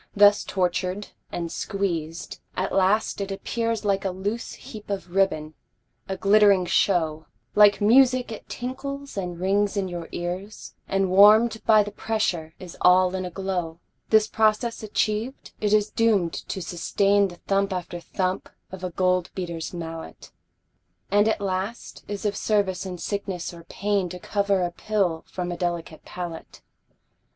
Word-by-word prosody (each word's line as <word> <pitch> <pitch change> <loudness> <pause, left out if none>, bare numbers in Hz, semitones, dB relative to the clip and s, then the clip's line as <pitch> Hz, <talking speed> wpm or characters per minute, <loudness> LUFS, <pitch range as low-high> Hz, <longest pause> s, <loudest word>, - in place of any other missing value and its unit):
Thus 205 0 +6
tortured 185 +1 -1 0.2
and 170 -1 -4
squeezed, 175 -5 -3 0.2
at 190 +1 -1
last 200 +2 +2
it 195 0 -3
appears 230 +2 -2
Like 195 -1 +1
a 195 - 0
loose 200 +5 -4
heap 210 -2 -11
of 190 -3 -4
ribbon, 155 -6 +1 0.6
a 190 - -2
glittering 200 -2 +5
show, 160 -4 +1 0.3
Like 205 -1 +6
music 250 +2 +5
it 220 - -9
tinkles 275 +3 -5
and 180 -3 -4
rings 200 +2 +1
in 195 -1 0
your 175 -2 -6
ears, 180 +4 -5
And 195 -1 +1
warm'd 215 +4 +6
by 215 -2 +7
the 205 - -7
pressure 190 -7 -2
is 180 -3 -10
all 180 0 +5
in 185 -1 -2
a - - -4
glow. 180 -3 -3 0.3
This 220 -1 +5
process 220 +2 +1
achiev'd, 215 +3 -2
it 210 -1 +1
is 210 0 +3
doom'd 210 -7 +2
to 190 - -5
sustain 195 +4 +2
The 175 - -10
thump 195 +2 0
after 175 -1 -4
thump 185 +2 -2 0.2
of 185 -1 -8
a 185 - -1
gold 180 0 +1
beater's 170 -3 -4
mallet, 165 -2 -8 0.8
And 205 +1 +4
at 220 - +1
last 195 +3 -4
is 205 +1 -5
of 205 - 0
service 195 -3 0
in 180 -1 -5
sickness 190 -2 -4
or 170 -1 -12
pain 200 -1 -1
To 180 - -7
cover 200 0 0
a 175 - -1
pill 185 -4 -1
from 180 -1 -4
a 175 - -4
delicate 170 -2 -3
palate. 175 -2 -7
195 Hz, 155 wpm, -25 LUFS, 180-210 Hz, 0.8 s, by